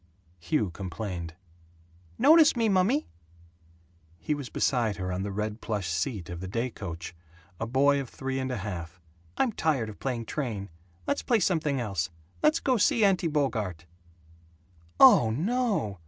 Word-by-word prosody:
Hugh 85 Hz, +3 st, 0 dB
complained, 90 Hz, -2 st, -6 dB, 0.8 s
"Notice 315 Hz, -2 st, +6 dB
me, 230 Hz, -2 st, +2 dB
mummy!" 205 Hz, +10 st, +2 dB, 1.1 s
He 85 Hz, -, -2 dB
was 145 Hz, -4 st, -5 dB
beside 115 Hz, -5 st, +1 dB
her 90 Hz, -1 st, -4 dB
on 90 Hz, +1 st, -2 dB
the 100 Hz, +1 st, -3 dB
red 105 Hz, +2 st, -3 dB
plush 100 Hz, -6 st, -3 dB
seat 85 Hz, +3 st, -2 dB
of 85 Hz, -1 st, -6 dB
the 95 Hz, -, -6 dB
day 115 Hz, +6 st, -2 dB
coach; 85 Hz, -5 st, -7 dB, 0.5 s
a 115 Hz, -, -2 dB
boy 140 Hz, +3 st, +3 dB
of 130 Hz, -, -8 dB
three 135 Hz, 0 st, -4 dB
and 130 Hz, 0 st, -2 dB
a 125 Hz, -, -2 dB
half. 90 Hz, -3 st, -6 dB, 0.4 s
"I'm 255 Hz, -, +2 dB
tired 145 Hz, -, 0 dB
of 105 Hz, -, -11 dB
playing 125 Hz, -4 st, -3 dB
train. 110 Hz, -, -4 dB, 0.3 s
Let's 285 Hz, -, 0 dB
play 235 Hz, -3 st, +2 dB
something 160 Hz, -7 st, +1 dB
else. 95 Hz, -9 st, -2 dB, 0.3 s
Let's 305 Hz, +1 st, +3 dB
go 255 Hz, -2 st, +1 dB
see 220 Hz, +1 st, +3 dB
Auntie 185 Hz, -3 st, +2 dB
Bogart." 110 Hz, -, -1 dB, 1.1 s
"Oh, 110 Hz, -, +8 dB
NO! 180 Hz, -, -1 dB
115 Hz, 155 wpm, -28 LUFS, 95-160 Hz, 1.1 s, Oh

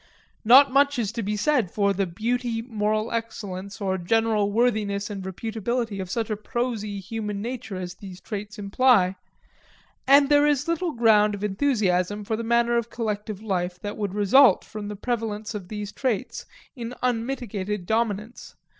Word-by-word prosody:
Not 260 Hz, +5 st, +7 dB
much 280 Hz, 0 st, +4 dB
is 220 Hz, -4 st, -1 dB
to 230 Hz, -, -4 dB
be 210 Hz, 0 st, -2 dB
said 235 Hz, -, +2 dB
for 200 Hz, +1 st, +1 dB
the 195 Hz, 0 st, -1 dB
beauty, 230 Hz, +5 st, -2 dB
moral 215 Hz, -1 st, -1 dB
excellence, 200 Hz, -4 st, -5 dB
or 190 Hz, -2 st, -1 dB
general 215 Hz, +2 st, +1 dB
worthiness 210 Hz, -3 st, 0 dB
and 200 Hz, -1 st, -5 dB
reputability 220 Hz, +2 st, -3 dB
of 185 Hz, -, -6 dB
such 225 Hz, +2 st, -2 dB
a -, -, +1 dB
prosy 215 Hz, -2 st, -3 dB
human 210 Hz, +1 st, -4 dB
nature 235 Hz, -2 st, -5 dB
as 180 Hz, -1 st, -5 dB
these 185 Hz, -1 st, -11 dB
traits 210 Hz, +1 st, -6 dB
imply; 200 Hz, -2 st, +3 dB, 0.9 s
and 280 Hz, +1 st, +7 dB
there 290 Hz, 0 st, +5 dB
is 290 Hz, 0 st, +1 dB
little 335 Hz, 0 st, -1 dB
ground 215 Hz, -3 st, +4 dB
of 200 Hz, -, -8 dB
enthusiasm 205 Hz, -4 st, 0 dB
for 220 Hz, +2 st, -2 dB
the 230 Hz, -, -4 dB
manner 235 Hz, +1 st, +2 dB
of 235 Hz, -1 st, -2 dB
collective 215 Hz, -3 st, -4 dB
life 180 Hz, -3 st, -2 dB
that 205 Hz, 0 st, -5 dB
would 205 Hz, -2 st, -3 dB
result 210 Hz, +2 st, +5 dB
from 215 Hz, -1 st, -7 dB
the 210 Hz, -, -5 dB
prevalence 220 Hz, -1 st, -3 dB
of 200 Hz, -4 st, -6 dB
these 210 Hz, 0 st, -5 dB
traits 240 Hz, -6 st, -3 dB, 0.3 s
in 240 Hz, -1 st, -6 dB
unmitigated 225 Hz, -6 st, -2 dB
dominance. 220 Hz, +1 st, -2 dB
215 Hz, 165 wpm, -25 LUFS, 200-235 Hz, 0.9 s, Not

